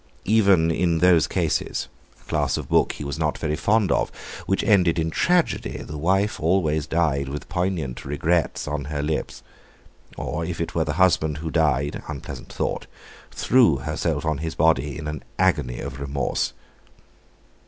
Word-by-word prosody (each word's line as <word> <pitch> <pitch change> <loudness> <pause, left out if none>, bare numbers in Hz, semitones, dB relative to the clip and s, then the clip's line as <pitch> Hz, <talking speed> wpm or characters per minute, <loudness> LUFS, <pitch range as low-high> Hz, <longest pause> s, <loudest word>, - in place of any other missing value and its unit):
Even 100 -6 +4
in 85 0 +1
those 85 -1 +5
cases—a - - -3
class - - 0
of - - -5
book - - +3
he - - -7
was 70 -1 -4
not - - 0
very 75 0 -1
fond 100 +3 +2
of—which 95 - -2
ended 90 -6 +4
in 80 0 0
tragedy, 175 - +1
the 75 - -7
wife 95 +7 +1
always 80 -3 +1
died 75 -5 0
with 75 +2 -6
poignant 90 -7 -2
regrets 75 +5 0
on 75 -1 -3
her 75 0 -3
lips, 75 +1 -3 0.7
or - - -3
if - - -4
it - - -3
were 80 -1 +1
the 75 - -2
husband 80 -3 +2
who 80 +1 -5
died—unpleasant 75 -2 -2
thought—threw 120 - 0
herself 65 +4 -2
on 80 -3 0
his 80 +1 -4
body 75 -3 +2
in 75 0 -6
an 75 -1 -4 0.2
agony 75 -10 +1
of 65 - -6
remorse. 70 0 -1
80 Hz, 150 wpm, -24 LUFS, 75-90 Hz, 0.7 s, those